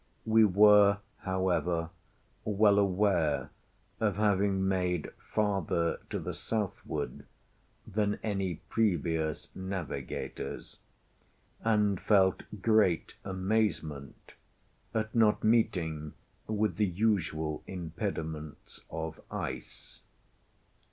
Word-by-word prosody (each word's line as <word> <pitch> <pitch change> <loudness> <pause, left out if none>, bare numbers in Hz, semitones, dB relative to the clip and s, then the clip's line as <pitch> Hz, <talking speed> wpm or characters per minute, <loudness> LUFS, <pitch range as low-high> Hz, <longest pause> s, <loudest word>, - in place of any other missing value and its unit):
We 110 0 +5
were, 105 0 +6 0.2
however, 90 -3 0 0.5
well 105 -1 +4
aware 95 -6 +1 0.5
of 105 -4 +1
having 100 -2 +2
made 90 -4 0 0.2
farther 95 -5 0
to - - -2
the - - -4
southward 110 -4 -4 0.6
than 105 0 0
any 95 -5 -1
previous 80 -7 0
navigators, 95 -8 -5 0.8
and 105 -4 +2
felt 95 -3 +4 0.2
great 110 -7 +3
amazement 95 -7 -2 0.6
at 110 -1 -2
not 110 -3 +3
meeting 90 -10 +1 0.3
with 110 -1 0
the 105 -1 +3
usual 85 -6 0
impediments 80 -3 -5
of 80 0 -5
ice. - - -6
95 Hz, 85 wpm, -30 LUFS, 85-105 Hz, 0.8 s, were